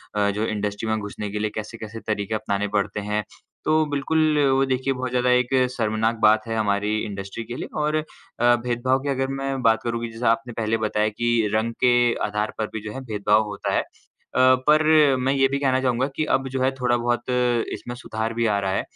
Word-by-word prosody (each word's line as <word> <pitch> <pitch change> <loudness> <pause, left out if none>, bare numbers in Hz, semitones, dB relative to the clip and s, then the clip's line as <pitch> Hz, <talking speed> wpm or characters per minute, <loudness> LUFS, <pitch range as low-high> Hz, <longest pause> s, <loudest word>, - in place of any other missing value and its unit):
अ, 105 -1 +2
जो 105 +2 -1
इंडस्ट्री 105 0 -3
में 110 - +1
घुसने 105 0 -5
के 105 - -3
लिए 110 - 0
कैसे-कैसे 110 0 -6
तरीके 105 0 -1
अपनाने 105 -1 -1
पड़ते 100 +1 -1
हैं। 105 0 0 0.4
तो 155 0 +3
बिल्कुल, 155 +2 +1
वो 135 +1 +3
देखिए 130 +1 0
बहुत 130 0 -3
ज़्यादा 125 0 +1
एक 125 +1 +2 0.2
शर्मनाक 110 -1 0
बात 110 +1 +4
है 115 - -2
हमारी 105 -1 0
इंडस्ट्री 100 +2 -6
के 120 +2 -7
लिए - - -5 0.2
और 150 +1 0
अ, 155 - 0 0.5
भेदभाव 120 +2 0
की 140 - -2
अगर 135 -1 0
मैं 135 0 -3
बात 115 -2 +4
करूँ 115 0 -2
कि 115 - -3
जैसा 115 +1 0
आपने 115 +1 -2
पहले 110 0 0
बताया 110 -1 0
कि 120 +3 -2 0.2
रंग 110 +2 0
के 125 - +6 0.3
आधार 105 +1 -2
पर 110 - -1
भी 110 - -4
जो - - -5
है 135 - -6
भेदभाव 105 -1 +2
होता 100 -1 -3
है। - - +3
अ, - - -11 0.8
पर 155 -2 +5
मैं 135 +2 +1
ये 135 -1 +3
भी 140 +1 -2
कहना 130 -2 +2
चाहूँगा 130 0 +1
कि 155 - 0
अब 135 0 -2
जो 130 - 0
है 130 +1 +3
थोड़ा-बहुत 120 0 0 0.4
इसमें 120 - -6
सुधार 110 -2 -4
भी 115 0 0
आ 105 -2 +2
रहा 95 -1 -1
है। - - 0
115 Hz, 215 wpm, -23 LUFS, 105-130 Hz, 0.8 s, के